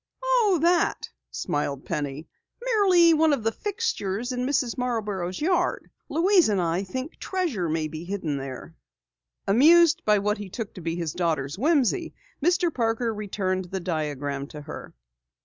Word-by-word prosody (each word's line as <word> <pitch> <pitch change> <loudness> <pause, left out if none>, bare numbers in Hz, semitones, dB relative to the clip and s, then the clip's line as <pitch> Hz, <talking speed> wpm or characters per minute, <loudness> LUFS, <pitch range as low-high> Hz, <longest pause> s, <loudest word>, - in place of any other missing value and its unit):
"Oh 480 -7 +3
that?" 345 +1 +2 0.2
smiled 140 -2 -3
Penny. 145 +1 -4 0.4
"Merely 375 -8 +5
one 315 -1 +4
of 255 -6 -1
the 225 - +1
fixtures 245 - -2
in 250 0 -2
Mrs. 265 -4 0
Marborough's 210 -8 -2
yard. 355 +2 0 0.2
Louise 355 - +4
and 200 -2 +1
I 170 +1 0
think 260 - -6
treasure 310 - -2
may 155 0 -1
be 155 +1 -7
hidden 175 -6 -3
there." 135 +4 -7 0.7
Amused 320 +9 +6
by 210 0 +4
what 210 +1 0
he 205 -2 -7
took 215 +2 -6
to 185 - -9
be 165 0 -2
his 165 -3 -3
daughter's 160 -5 -1
whimsy, 320 - +1 0.3
Mr. 350 0 +2
Parker 230 -1 0
returned 190 -3 -2
the 190 +2 -4
diagram 145 -5 -3
to 150 - -9
her. 145 - -9
215 Hz, 150 wpm, -25 LUFS, -, 0.7 s, Amused